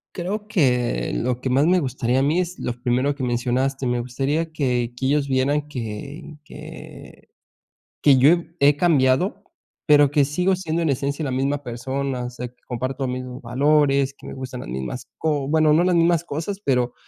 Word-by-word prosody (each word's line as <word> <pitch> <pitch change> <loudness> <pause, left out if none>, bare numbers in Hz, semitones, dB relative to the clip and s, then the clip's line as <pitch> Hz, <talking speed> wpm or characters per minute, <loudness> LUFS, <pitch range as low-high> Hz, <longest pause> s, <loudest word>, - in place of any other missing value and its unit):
Creo 205 +4 -4
que 125 - +1
lo 125 - -1
que 130 - -2
más 135 +4 +3
me 180 +1 +4
gustaría 130 -2 0
a - - +2
mí, 155 +6 +2
es 180 0 -4
lo 125 - -2
primero 130 +3 +1
que 140 - -7
mencionaste. 125 +2 -1
Me 125 0 0
gustaría 135 +7 -2
que 125 -5 -1
que 130 - -2
ellos 140 +1 +1
vieran 140 +3 +1
que 135 +5 -7
que - - -12 0.7
que 140 -2 +6
yo 130 +3 +6
he 170 0 +2
he 145 +1 +5
cambiado, 165 +5 +2 0.4
pero 145 -2 +6
que 145 -1 +3
sigo 180 +7 +1
siendo 170 -2 -2
en 165 - +1
esencia 140 +2 -1
la 140 - -2
misma 135 +2 -1
persona, 130 +1 -3
o 125 - -4
sea, 125 0 -6
que 120 - -26
comparto 130 +2 -3
los 125 - -2
mismos 125 0 -6
valores, 140 +2 +2
que - - -14
me - - -7
gustan 130 -1 -7
las - - -8
mismas 65 - -5
co 145 -4 -1
bueno, 155 0 +4
no 170 +3 +4
las 185 0 +2
mismas 170 0 +3
cosas, 170 +5 -4
pero 125 -2 +1
140 Hz, 195 wpm, -22 LUFS, 125-155 Hz, 0.7 s, que